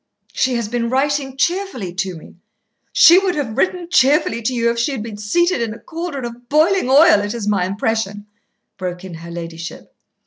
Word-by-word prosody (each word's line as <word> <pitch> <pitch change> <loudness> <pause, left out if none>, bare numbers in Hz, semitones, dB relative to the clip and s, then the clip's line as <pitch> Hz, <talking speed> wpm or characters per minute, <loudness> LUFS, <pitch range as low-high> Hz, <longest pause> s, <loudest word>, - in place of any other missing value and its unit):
"She 255 -1 +1
has 235 -3 -2
been 235 +1 -2
writing 270 +1 -1
cheerfully 340 - -1
to 185 0 -3
me 160 - -14 0.3
" - - -50
"She 345 +2 +7
would 385 -2 -1
have 260 -8 -3
written 355 +4 0
cheerfully 275 -7 +3
to 225 - -1
you 235 -2 +1
if 235 - -3
she 255 +5 0
had 230 -6 -4
been 225 -2 -7
seated 340 - +1
in 225 -2 -3
a - - -13
cauldron 325 -6 -5
of 240 +1 -10
boiling 315 +1 +3
oil, 275 -6 +6
it 205 +2 -4
is 220 -3 -4
my 200 -4 +1
impression," 205 0 -2 0.5
broke 180 -1 -5
in 185 - -8
her 165 +1 -9
ladyship. 170 0 -8
235 Hz, 200 wpm, -19 LUFS, 205-290 Hz, 0.5 s, She